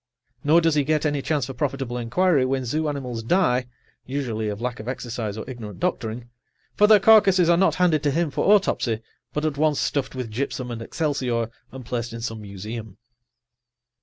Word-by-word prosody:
Nor 160 +4 +5
does 165 -1 +2
he 145 -1 +2
get 155 +2 0
any 145 -2 0
chance 145 -2 0
for 135 - -6
profitable 135 -2 -2
inquiry 135 +6 +2
when 130 0 -1
zoo 155 +5 -1
animals 125 -5 -4
die 125 -2 +2 0.4
(usually 120 -6 -3
of 105 0 -4
lack 125 0 -3
of 110 - -8
exercise 120 -4 -4
or 110 - -6
ignorant 115 -5 -8
doctoring), 120 -9 -2 0.5
for 210 - +4
their 215 -1 +7
carcasses 195 -5 +6
are - - +5
not 190 +3 +3
handed 170 -5 +3
to 150 - +1
him 160 +2 0
for 190 - +2
autopsy, 120 - +2 0.3
but 150 +1 -2
at 150 -2 -1
once 155 -2 +2
stuffed 140 -2 -1
with 125 -4 -5
gypsum 125 +1 -3
and 115 -1 -5
excelsior 125 -5 -1 0.2
and 130 -2 -9
placed 120 0 -3
in 115 - -6
some 115 -2 -4
museum. 105 +1 -7
130 Hz, 190 wpm, -24 LUFS, 115-155 Hz, 0.5 s, their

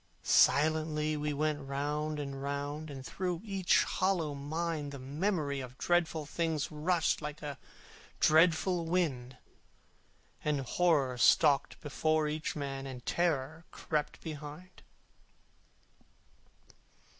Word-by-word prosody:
Silently 155 0 +3
we 150 0 -2
went 150 0 -1
round 150 +2 -2
and 140 -1 -5
round, 145 +2 -4
And 135 -2 -8
through 180 +1 -3
each 195 -4 +3
hollow 180 -6 0
mind 150 +1 -3
The 140 - -7
Memory 145 +1 -1
of 125 -1 -8
dreadful 165 -2 +1
things 160 -1 -1
Rushed 160 +2 +1
like 150 0 -6
a 145 -2 -5 0.6
dreadful 165 +2 +4
wind, 135 -8 -1 1.1
And 150 -2 0
Horror 135 -3 +1
stalked 140 +2 +4
before 155 +1 +1
each 155 +1 -3
man, 135 -2 -4
And 125 -2 -8
Terror 160 -2 0
crept 150 -2 -3
behind. 155 +3 -8
150 Hz, 110 wpm, -32 LUFS, 140-165 Hz, 1.1 s, dreadful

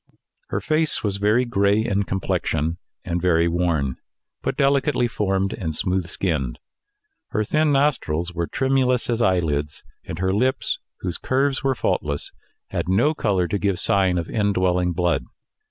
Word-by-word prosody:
Her - - -2
face 155 0 +2
was 100 -2 -1
very 105 +5 +2
gray 105 -2 +2
in 100 -3 +1
complexion, 85 -4 -1 0.3
and 85 0 -2
very 85 -2 +3
worn, 85 -6 0 0.4
but - - -2
delicately 140 -2 +2
formed, 95 -3 -1
and 80 -4 -4
smooth 90 +1 0
skinned. 80 -9 -2 0.7
Her 110 - -1
thin 155 +7 +2
nostrils 105 - +1
were 85 -1 -2
tremulous 130 -2 +1
as 120 0 0
eyelids, 80 -8 0 0.2
and 80 - -6
her 95 +1 0
lips, 130 +6 0 0.2
whose 90 -2 -3
curves 135 +1 0
were 135 -1 +1
faultless, 75 -9 -1 0.4
had - - -2
no 120 +12 +3
colour 95 - 0
to 100 - -1
give 100 -2 0
sign 95 -1 +3
of 85 - -2
indwelling 90 -4 +1
blood. 90 0 +1
95 Hz, 150 wpm, -23 LUFS, 85-125 Hz, 0.7 s, very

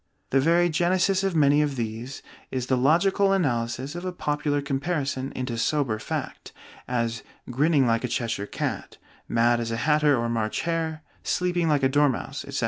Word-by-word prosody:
The 135 - +4
very 170 +4 +4
genesis 180 +3 +1
of 195 -3 0
many 145 -1 +4
of 145 -2 -1
these 115 +2 -5 0.3
is 130 -2 -3
the 130 - +1
logical 190 +9 +3
analysis 130 -5 -1
of 175 +1 -6
a 185 - -2
popular 150 -3 -1
comparison 140 -1 -2
into 125 -3 -3
sober 130 -5 0
fact, - - -5 0.4
as 115 -2 -1 0.3
"grinning 145 +2 +3
like 115 0 +1
a - - 0
Cheshire 115 -4 -2
cat," - - -4 0.3
"mad 120 +1 +2
as 115 -1 -3
a 115 - -2
hatter" 150 +1 +3
or 120 0 -1
"March 115 -2 -1
hare," 160 -2 -2 0.2
"sleeping 175 -2 0
like 145 -3 +2
a - - +6
dormouse," 145 -1 0
etc. - - -4
140 Hz, 170 wpm, -25 LUFS, 120-165 Hz, 0.4 s, a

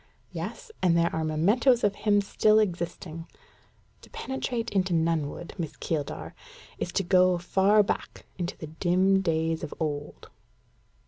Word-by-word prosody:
"Yes, - - -6
and 170 -2 +3
there 170 0 +1
are 160 - -1
mementos 210 - +3
of 205 - +3
him 205 0 +2
still 215 +2 +3
existing. 170 -4 -2 0.7
To - - -16
penetrate 245 -3 -3
into 190 -3 +1
Nunnwood, 165 0 -1
Miss 160 -4 -4
Keeldar, 155 -3 -4 0.5
is - - -3
to 195 - +1
go 185 0 +4
far 195 +4 +3
back - - -4
into 175 +1 -3
the - - -7
dim 185 +5 +2
days 160 -2 0
of 155 - -6
old. 145 -2 -4
180 Hz, 140 wpm, -27 LUFS, 160-205 Hz, 0.7 s, go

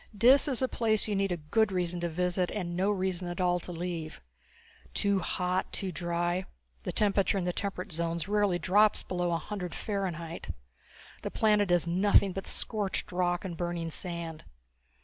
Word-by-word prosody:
Dis 255 +7 +7
is 265 -2 +1
a - - +3
place 220 -4 +1
you 210 - 0
need 195 -1 +1
a 175 - 0
good 205 +8 +1
reason 180 -1 -1
to 170 0 -1
visit 180 +2 0
and 175 -4 -3
no 190 +3 +1
reason 185 -3 -1
at 175 +1 -5
all 180 -1 +2
to 180 - -8
leave. 170 -2 -4 0.8
Too 200 -1 +2
hot, 180 +1 -1
too 190 -2 -3
dry; 175 +1 -1 0.4
the - - -3
temperature 200 -1 +2
in 190 - 0
the 180 - 0
temperate 190 -2 -4
zones 170 0 -2
rarely 205 -3 +2
drops 205 +5 +4
below 175 -1 -1
a 170 - +2
hundred 180 +1 -5
Fahrenheit. 175 - -4 0.7
The - - -3
planet 210 -2 +3
is 175 -1 +3
nothing 190 +2 +3
but 195 - -5
scorched 205 -5 -1
rock 175 0 0
and 175 -3 -4
burning 175 -1 -3
sand. 170 -2 -5
180 Hz, 175 wpm, -30 LUFS, 175-200 Hz, 0.8 s, Dis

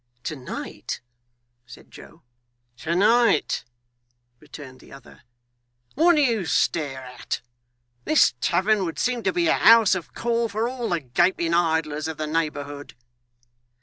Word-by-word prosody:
'To 155 - -4
night!' 130 -3 -7 0.7
said 125 - -15
Joe. - - -15 0.5
'To 165 +4 -3
night,' 230 +5 +3 0.8
returned 145 -4 -12
the - - -18
other. 135 - -15 0.7
'What 340 +4 +4
do 300 - +3
you 225 -9 0
stare 140 -5 -1
at? 125 0 -6 0.6
This 155 - +4
tavern 195 +3 +1
would 165 -3 -4
seem 250 -1 -1
to - - 0
be 350 -1 0
a - - +4
house 225 -2 +6
of 185 -3 -5
call 235 0 -1
for 215 +3 -1
all 245 -2 -4
the 170 -2 -1
gaping 170 +6 0
idlers 160 -3 0
of 160 -2 -6
the 155 - -3
neighbourhood! 145 -2 -4
170 Hz, 140 wpm, -23 LUFS, 150-230 Hz, 0.8 s, house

